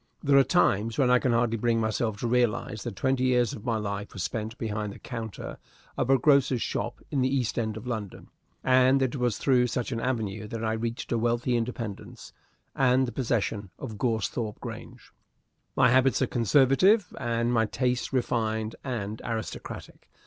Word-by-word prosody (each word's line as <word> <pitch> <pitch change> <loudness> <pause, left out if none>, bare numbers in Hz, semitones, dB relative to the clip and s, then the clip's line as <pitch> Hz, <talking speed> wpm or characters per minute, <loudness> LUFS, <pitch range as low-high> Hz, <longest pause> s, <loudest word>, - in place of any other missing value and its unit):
There 140 -1 +3
are 135 - +8
times 115 - +2
when 130 -3 +3
I 125 - +6
can 125 - +1
hardly 115 -1 +1
bring 115 +1 +1
myself 110 -1 -1
to 120 - 0
realize 115 -3 0
that 120 -5 -5
twenty 130 +3 0
years 125 -3 +2
of 105 - -8
my 115 -3 +1
life 100 -1 -4
were - - -9
spent 110 +5 -3
behind 105 -2 -3
the - - -11
counter 115 -4 -7 0.4
of - - -1
a 135 - +6
grocer's 135 -3 +3
shop - - -3
in 140 - +1
the 130 - +2
East 130 -4 0
End 110 -2 -2
of 110 - -8
London, 110 -6 -5 0.3
and 130 +1 +4
that 130 -2 0
it - - -3
was 120 -4 0
through 125 -3 +3
such 125 +2 -3
an 115 - -2
avenue 110 -5 -2
that 115 +1 -5
I 110 - 0
reached 115 +1 -4
a 115 - +1
wealthy 120 +2 +1
independence 115 -3 -5 0.4
and 130 0 +3
the - - -4
possession 110 -4 -1
of 110 -6 -7
Goresthorpe 110 -1 -1
Grange. - - -9 0.6
My 125 - +5
habits 130 +1 +4
are - - +4
conservative, 135 - +3
and 115 0 0
my 115 -2 +2
tastes 125 +2 -1
refined 110 -4 -1
and 110 -5 -4
aristocratic. 110 -2 -6
120 Hz, 185 wpm, -27 LUFS, 110-130 Hz, 0.6 s, are